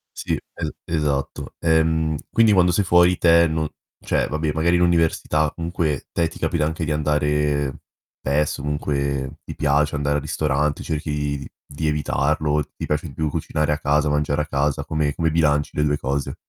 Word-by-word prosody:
Sì, - - -3
e - - -6
esatto. 75 -4 -2
Ehm, 80 -1 +2
quindi 115 -2 +4
quando 90 -2 +4
sei 100 +3 +2
fuori 90 0 +4
te 85 0 +5
non 80 -1 -1 0.3
cioè, - - 0
vabbè 80 0 -1
magari 85 +2 +2
l'università 80 -3 +2
comunque 85 -4 -2
te 85 -1 +1
ti - - -12
capita 75 - 0
anche 80 +1 -2
di 80 - -2
andare, 75 -2 0 0.4
spesso 75 +1 0
comunque, 70 -1 -2
ti - - -8
piace 75 0 +1
andare 75 0 0
al 75 - 0
ristorante, 75 -1 -1
cerchi 75 -2 -2
d 70 - -8 0.3
di 75 +2 -2
evitarlo, 75 0 +1
ti - - -8
piace 75 +2 -1
di 70 - -10
più 80 +2 -1
cucinare 75 +1 -1
a 75 - +1
casa, 75 +1 +1
mangiare 75 0 +1
a 75 - -4
casa, 70 -1 0
come 75 -2 0
come 80 +1 0
bilanci 75 -3 +2
le 75 - +3
due 75 0 +1
cose? 70 -1 -2
75 Hz, 175 wpm, -22 LUFS, 75-80 Hz, 0.4 s, te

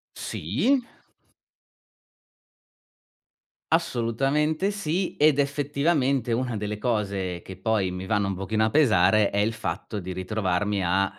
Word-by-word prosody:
Sì. 140 - 0 2.9
Assolutamente 150 - +1
sì, 185 -1 -2
ed 150 -1 +4
effettivamente 140 -2 +1
una 120 0 -1
delle 105 0 -3
cose 100 -6 -2
che 95 - -10
poi 100 -2 0
mi 90 +1 -5
vanno 100 0 +1
un 100 - -1
pochino 105 +4 -1
a 110 - +2
pesare 110 - +4
è 100 - -1
il 105 +2 +2
fatto 110 -1 -4
di 90 0 -6
ritrovarmi 95 +1 -1
a, 95 +3 +2
110 Hz, 120 wpm, -25 LUFS, 95-145 Hz, 2.9 s, ed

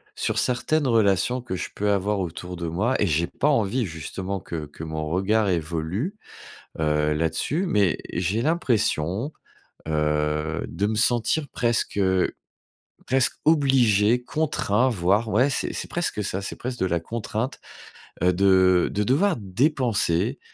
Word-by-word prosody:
sur - - -2
certaines 135 +4 +1
relations 115 +2 +2
que 105 -6 -5
je - - -4
peux 105 0 0
avoir 100 +1 0
autour 90 0 -5
de 85 - -4
moi 100 +11 0
et 105 - +3
j'ai 85 +1 +1
pas 145 - -1
envie 115 -2 +1
justement 95 +4 -5
que 80 -3 -6
que 75 +2 -9
mon 80 -1 -4
regard 100 +5 +1
évolue, 85 - -2 0.6
heu, 75 -1 +1
là-dessus, 80 - -1
mais 100 - +2 0.2
j'ai 95 +6 0
l'impression, 120 - 0 0.6
heu, 75 +1 0
de 100 - -1
me 110 - -1
sentir 120 +6 +2
presque, 120 -4 -1
heu, 95 -2 +2 0.8
presque 130 -1 +2
obligé, 125 -7 +3
contraint, 130 -6 +1
voire 100 +1 +1
ouais, 125 +7 +3
c'est - - -1
c'est - - -4
presque 175 -11 -2
ça, 95 0 -2
c'est - - -5
presque 125 0 -5
de - - +1
la 85 -1 0
contrainte, 110 +6 -4 0.6
heu, 90 0 +4
de 95 -1 +4
de 105 - 0
devoir 155 - +2
dépenser, 115 - +1
100 Hz, 145 wpm, -24 LUFS, 85-125 Hz, 0.8 s, heu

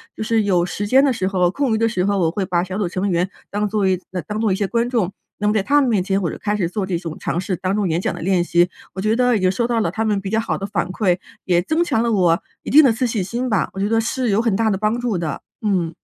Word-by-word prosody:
就 - - -4
是 225 0 +2
有 180 -4 +2
时 205 +3 -4
间 265 +5 +5
的 270 - +2
时 190 -5 -1
候、 180 -2 +2
空 275 0 0
余 - - +1
的 230 +1 +2
时 200 -5 -1
候， 200 +1 +1
我 165 -4 +2
会 195 +3 -2
把 175 -2 0
小 185 +1 -5
组 200 - 0
成 185 +3 -2
员 175 +2 +1 0.2
当 205 +1 -1
作 205 -1 +1
一 185 -1 +1 0.3
当 210 0 -3
作 220 -3 +2
一 - - +2
些 200 +1 -1
观 235 +3 0
众， 215 -7 0 0.2
那 205 - -3
么 210 - +3
在 215 - +2
他 285 +9 +3
们 260 - +1
面 205 -6 +2
前 195 0 0
我 175 -5 -1
就 - - -7
开 210 0 -1
始 180 -5 0
做 195 +3 -3
这 190 -2 -1
种 165 -2 -6
尝 170 - -2
试。 185 0 -2
当 185 +3 -2
做 210 -1 0
演 170 -1 0
讲 - - -1
的 - - -8
练 180 0 +2
习， 175 +1 +2 0.2
我 190 - -3
觉 215 +2 +1
得 250 0 +3
已 - - -2
经 185 -1 +2
收 235 +5 0
到 235 -2 +1
了 170 - 0
他 220 +4 -2
们 210 -2 +1
比 195 0 -5
较 220 - +2
好 225 - -2
的 195 - -4
反 195 -4 -2
馈， 185 -2 +1 0.3
也 175 -2 +3
增 315 - +1
强 225 -9 0
了 235 0 +1
我 175 -5 +3 0.2
一 - - -5
定 305 +3 +8
的 265 - +5
自 245 +3 -1
信 225 -5 -1
心 235 +7 -3
吧， 215 -5 +1
我 195 - -6
觉 200 - +1
得 225 +1 +2
是 245 +1 -1
有 205 - +3
很 230 -4 +1
大 220 0 +2
的 195 - 0
帮 215 +3 0
助 240 -4 -1
的， 165 -5 -3 0.2
嗯。 185 -6 0
200 Hz, 345 characters per minute, -20 LUFS, 185-225 Hz, 0.3 s, 定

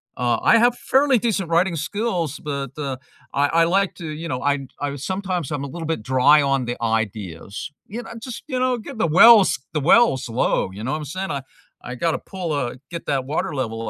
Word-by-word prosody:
uh, 120 -1 +1
I - - +6
have 240 +1 +3
fairly 270 0 +3
decent 210 -6 -1
writing 170 +1 +2
skills, 170 - -2
but 140 -2 -4
I 140 0 -3
I 165 +3 +3
like 190 +3 +1
to, 170 - -9
you 160 +2 -6
know, 125 -4 -3
I 140 -1 0
I 145 -1 -3
sometimes 180 +1 -3
I'm 145 -2 -3
a - - -4
little 165 +3 -6
bit 160 -9 -2
dry 130 +5 +5
on 135 -2 +1
the 120 0 -4
ideas, 105 - -3 0.2
you 235 +5 -6
know - - -10
just, 240 0 -8
you 260 -4 -2
know, 255 -1 +1
get 235 +2 -9
the 165 - +2
wells 200 +5 +7 0.2
the 155 - 0
wells 140 - +4
low, 115 -4 0
you 100 +3 -8
know 130 - -2
what - - -1
I'm 150 - -6
saying, 185 +7 -4 0.5
I 125 - -7
got 165 +7 0
to - - -2
pull, 180 -4 -5
uh 125 -4 -2 0.2
get 170 - -7
that 135 -2 0
water 155 +4 -2
level 115 -4 -3
155 Hz, 215 wpm, -22 LUFS, 130-190 Hz, 0.5 s, wells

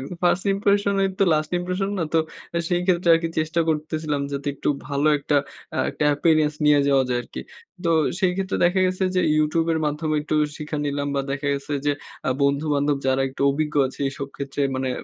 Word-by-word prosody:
একদম। 145 +7 -7
"ফার্স্ট 175 +2 +2
ইম্প্রেশনই 200 -1 +2
তো 195 - +4
last 155 0 -1
impression 185 +2 -2
না?" - - 0
তো - - +5 0.4
আ - - +3
সেই 175 -1 +1
ক্ষেত্রে 175 -2 +2
আর - - +3
কি 165 - -1
চেষ্টা 160 +2 0
করতেছিলাম 155 -1 -1
যাতে 140 +1 -4
একটু - - -3 0.2
ভালো 145 +1 0
একটা 145 +1 0 0.4
আ - - -1
একটা - - -2
appearance 155 0 +2
নিয়ে 150 -1 +5
যাওয়া 135 -1 +4
যায় 120 - +1
আরকি। - - -8 0.4
তো - - +1 0.3
সেই 185 -2 +2
ক্ষেত্রে 195 0 -1
দেখা 180 +2 +3
গেছে 185 +1 -1
যে - - +4 0.2
YouTube 160 +2 +1
এর 160 - 0
মাধ্যমে 155 +1 -1
একটু 155 - -3 0.2
শিখা 150 0 -5
নিলাম 145 0 -2
বা 140 - +1
দেখা 140 +1 -3
গেছে 140 +1 -5
যে 145 - +3 0.4
আ - - +2
বন্ধু-বান্ধব 145 0 +1
যারা 130 0 +2
একটু 130 - -12
অভিজ্ঞ 150 +1 -2
আছে 130 - -10
এইসব 140 0 -5
ক্ষেত্রে 140 0 -5 0.2
মানে 130 0 -1
155 Hz, 205 wpm, -23 LUFS, 140-175 Hz, 0.4 s, তো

